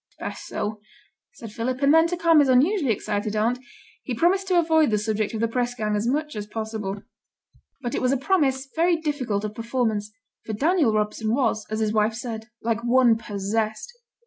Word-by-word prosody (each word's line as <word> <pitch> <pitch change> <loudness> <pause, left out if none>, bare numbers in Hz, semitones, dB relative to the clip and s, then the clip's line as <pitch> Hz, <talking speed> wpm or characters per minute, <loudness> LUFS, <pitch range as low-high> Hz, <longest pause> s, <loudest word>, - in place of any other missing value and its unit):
'It's - - -35
best - - -6
so,' 210 0 -4 0.5
said 230 -8 -10
Philip, 250 +4 -3
and 280 +2 +5
then, 325 +1 +6
to 355 +1 -3
calm 335 -2 +5
his 285 -2 +4
unusually 280 - +3
excited 210 0 -2
aunt, 230 +4 +1 0.4
he 250 - -4
promised 380 - +2
to 365 -2 +2
avoid 320 -3 +4
the 215 - +2
subject 215 +1 -1
of 220 - -3
the 230 - +2
press 245 +1 -1
gang 215 -3 -1
as 210 +3 -1
much 300 +2 -1
as 210 -1 -5
possible. 215 -2 -5 0.8
But 240 - -3
it - - -1
was 255 - +2
a 275 - +2
promise 270 -3 +1
very 340 +2 +3
difficult 260 -10 -2
of 210 - -5
performance, 225 -3 -2 0.3
for 220 - -5
Daniel 300 - +2
Robson 215 +1 0
was, 240 -5 0
as 215 +1 -2
his 215 -1 0
wife 215 +1 +2
said, 225 -2 -6 0.2
like 230 0 -1
one 240 -1 +4
possessed. 215 - -3
230 Hz, 200 wpm, -24 LUFS, 215-285 Hz, 0.8 s, then